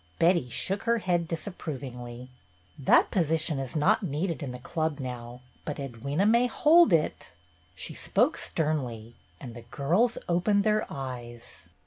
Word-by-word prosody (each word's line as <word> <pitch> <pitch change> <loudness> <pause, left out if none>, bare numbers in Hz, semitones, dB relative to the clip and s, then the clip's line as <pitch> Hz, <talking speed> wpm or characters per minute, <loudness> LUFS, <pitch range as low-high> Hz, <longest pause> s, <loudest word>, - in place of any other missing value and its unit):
Betty 170 -6 +3
shook 195 - -2
her 235 0 +3
head 175 -5 0
disapprovingly. 130 - -6 0.5
"That 135 - +4
position 160 -4 0
is 135 0 -5
not 185 +10 +3
needed 165 -2 -2
in 140 -3 -4
the 125 - -6
Club 155 +3 -2
now, 125 -1 -6 0.2
but 150 - -4
Edwyna 140 - -1
may 235 +3 +4
hold 310 - +5
it." 160 -3 0 0.4
She - - -6
spoke - - +1
sternly, 125 -8 -2 0.3
and 120 -4 -8
the 120 - -9
girls 165 - +1
opened 200 +4 +2
their 215 0 +1
eyes. 120 -3 -8
150 Hz, 140 wpm, -28 LUFS, 125-185 Hz, 0.5 s, hold